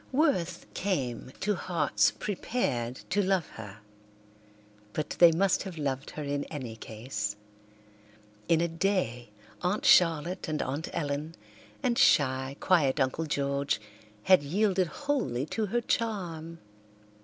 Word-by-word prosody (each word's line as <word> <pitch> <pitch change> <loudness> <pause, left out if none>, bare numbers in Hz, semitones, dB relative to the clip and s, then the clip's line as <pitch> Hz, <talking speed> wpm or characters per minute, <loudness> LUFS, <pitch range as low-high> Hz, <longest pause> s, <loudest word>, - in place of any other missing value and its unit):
Worth 255 - +1
came 130 - -2
to 210 +1 +1
hearts 150 - +2
prepared 140 - -2 0.2
to 205 +2 +3
love 190 -4 +1
her, 105 -1 -10 1.1
but 155 - -3
they 170 -1 +9
must 185 +3 +2
have 185 -3 -7
loved 140 -2 -2
her 150 - -3
in 145 0 -2
any 130 -7 -6
case. 110 -1 -4 1.1
In 165 -1 +4
a 170 - +2
day 165 - -1 0.3
Aunt 205 +10 0
Charlotte 180 - +4
and 155 -1 -2
Aunt 140 +5 -3
Ellen 150 +2 -3 0.5
and 245 -2 +1
shy, 130 -2 +3
quiet 155 -6 +3
Uncle 135 +4 0
George 140 -3 0 0.4
had 185 -4 +6
yielded 185 +4 +1
wholly 155 - -1
to 215 +7 -2
her 240 +5 0
charm. 175 -9 -2
160 Hz, 125 wpm, -29 LUFS, 135-190 Hz, 1.1 s, they